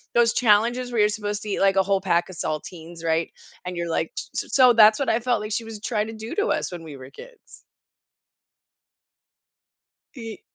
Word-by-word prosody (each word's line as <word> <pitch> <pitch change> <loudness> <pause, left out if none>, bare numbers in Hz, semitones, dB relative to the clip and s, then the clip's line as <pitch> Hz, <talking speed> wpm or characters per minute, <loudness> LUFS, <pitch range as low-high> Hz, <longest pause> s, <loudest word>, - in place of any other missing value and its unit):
those 235 -1 +4
challenges 240 +2 +2
where 230 - 0
you're 210 - +4
supposed 210 -1 -4
to 210 - -7
eat 200 - -2
like 195 0 +3
a 190 - +4
whole 195 0 +1
pack 170 +2 +1
of 185 - -10
saltines, 165 +2 -6
right? 165 0 0 0.4
And 180 0 -5
you're 170 0 -3
like - - -1
s - - -4
s - - -6
so 255 -2 +7
that's 215 -2 +6
what 275 - -1
I 225 - +2
felt 240 -1 0
like 210 +1 -6
she 225 +2 -2
was 220 -2 -9
trying 215 -2 -1
to 225 - -7
do 220 +1 -7
to 420 +2 0
us - - -1
when 175 -2 -8
we 155 -3 -9
were 130 -1 -11
kids. - - -15 2.5
Ye 225 -4 -8
210 Hz, 210 wpm, -23 LUFS, 175-230 Hz, 2.5 s, so